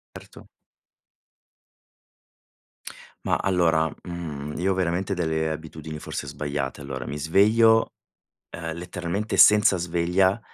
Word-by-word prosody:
Erto. - - -13 2.8
Ma, - - +2
allora, 85 -4 +2 0.2
mhmm, 75 -4 -6
io 95 +3 +1
ho - - -1
veramente 95 +2 -1
delle 80 -3 -1
abitudini 80 0 -7
forse 75 - -6
sbagliate. 70 -2 -4
Allora, 65 -3 -6
mi 75 - -5
sveglio, 110 +8 +4 0.6
ehm, 80 -1 -5
letteralmente 90 +4 -4
senza 105 -2 +6
sveglia, 90 +4 +1
85 Hz, 100 wpm, -24 LUFS, 80-95 Hz, 2.8 s, senza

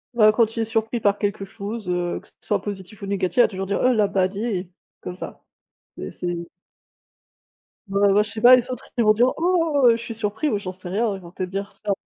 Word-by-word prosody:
Bah, 215 -2 +6
quand 225 0 +1
il 230 - -1
est 225 - 0
surpris 225 +1 -1
par 205 -1 +1
quelque 205 -1 -2
chose, 205 +1 -7
heu, 175 -1 -1
que - - -21
ce - - -24
soit 205 -2 -1
positif 200 0 -7
ou - - -2
négatif, 195 +3 -2
il - - +8
va - - +4
toujours 190 -1 -5
dire: 200 - -1
«Oh! 255 - +5
Labadi!» 200 -1 0 0.3
comme 180 - -6
ça, - - -9 0.5
et - - -6
c'est 175 -1 -4 1.5
Bah 200 +1 -1
bah, 210 - +5
je 215 - -9
sais 220 - -6
pas, 250 +1 +9
les 250 0 -1
autres 250 -2 -7
ils 235 - +3
vont 215 0 +6
dire: 245 +4 +3
«Oh! 330 -6 +3
Je - - -3
suis 230 0 -7
surpris» 220 +7 -1
ou 205 - 0
«J'en 185 -2 -5
sais 185 -1 -10
rien», 210 +3 0
ils - - -8
vont 170 -1 -12
peut 185 - -5
être 180 - -4
dire 195 +1 -5
ça 205 - -3
210 Hz, 245 wpm, -23 LUFS, 195-230 Hz, 1.5 s, pas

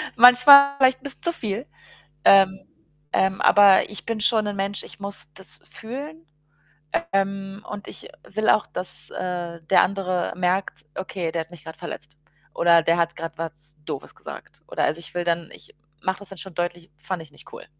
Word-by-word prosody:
Manchmal 250 +4 +9
vielleicht 260 -1 +4
'n - - -27
bisschen 280 - -4
zu 340 - 0
viel. 220 -1 -3 0.6
Ähm, 195 -1 +6 0.5
ähm, 190 0 +1
aber 200 -1 +6
ich 210 -4 -8
bin 230 -2 -3
schon 215 0 +3
'n 205 - -3
Mensch, 195 +1 -3
ich - - -12
muss 200 -6 -4
das 190 - -5
fühlen. 225 - -8 0.9
Ähm, 195 +1 -2
und 205 -1 -7
ich - - -8 0.2
will 215 +2 0
auch, 215 - +4
dass, 180 0 +1
äh, 175 -2 -5
der 185 - +4
andere 185 -2 -2
merkt, 180 -2 -1
okay, 185 -3 -4
der 165 0 -2
hat 160 +2 -11
mich 165 -4 -13
grad 160 0 -10
verletzt. 150 +1 -8 0.4
Oder 170 0 +5
der 165 +1 +2
hat 170 0 0
grad 165 0 -7
was 155 -2 -5
Doofes - - -6
gesagt. - - -11
Oder - - -2
also, 155 - -1
ich 165 -1 -9
will 175 - -2
dann 170 -1 -1
ich - - -13 0.3
mache 190 0 -1
das 205 - -7
dann 195 - -9
schon 190 -4 -9
deutlich: 175 0 -4
„Fand 180 +3 -5
ich 160 -2 -14
nicht - - -18
cool.“ - - -10
190 Hz, 190 wpm, -23 LUFS, 170-205 Hz, 0.9 s, Manchmal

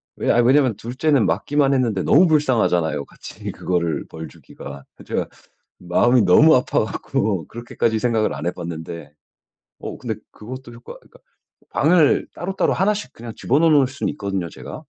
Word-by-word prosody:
왜 - - -2
아 - - +2
왜냐면 130 -1 +3
둘째는 130 +3 0
맞기만 140 +6 +1
했는데 115 -8 0
너무 175 +5 +5
불쌍하잖아요, 110 - +1
같이 - - -9
그거를 85 -5 -2
벌 80 0 -8
주기가. 70 - -11
그 - - -15
제가 - - -3 0.5
마음이 120 +8 +3
너무 130 - +6
아파 125 - +1
갖고 100 -7 -2
그렇게까지 115 -1 -2
생각을 115 -2 0
안 75 +4 -6
해봤는데 85 -3 -6 0.7
어 - - -7
근데 110 -4 -5 0.2
그것도 125 +2 -10
효과 120 +1 -11
그러니까 - - -22 0.5
방을 160 0 +3
따로따로 190 +3 -1
하나씩 205 +2 -1
그냥 115 0 -9
집어넣어 155 +6 +2
놓을 145 -3 +5
순 130 +2 -4
있거든요 100 - -3
제가. - - -9
120 Hz, 370 characters per minute, -21 LUFS, 90-140 Hz, 0.7 s, 너무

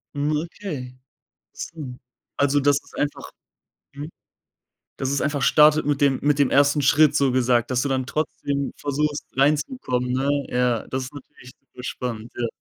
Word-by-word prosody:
Hm, 145 +2 0
okay. 150 -6 -6 0.6
Interessant. 140 -7 -8 0.4
Also, 140 0 +2
dass 140 0 +3
es - - -20
einfach 145 0 -3 0.6
mhm. 145 +3 -7 0.9
Dass 135 - -2
es 140 0 0
einfach 145 -1 -1
startet 150 +1 +5
mit 145 -1 0
dem 135 -2 +3
mit 145 0 +2
dem 140 - +3
1. 145 +1 +3
Schritt, 150 +2 +4
so 135 -2 +2
gesagt, 120 -1 +2
dass 125 -1 +1
du 140 - -1
dann 130 -1 0
trotzdem 140 -1 -2
versuchst, 145 +1 -2
reinzukommen, 135 - 0
ne? 135 +2 0 0.2
Ja, 125 -2 0
das 130 0 -3
ist 130 - -10
natürlich 125 -2 -13
super 125 -2 -14
spannend, 120 -3 -5
ja. 120 -1 -1
140 Hz, 160 wpm, -23 LUFS, 125-145 Hz, 0.9 s, startet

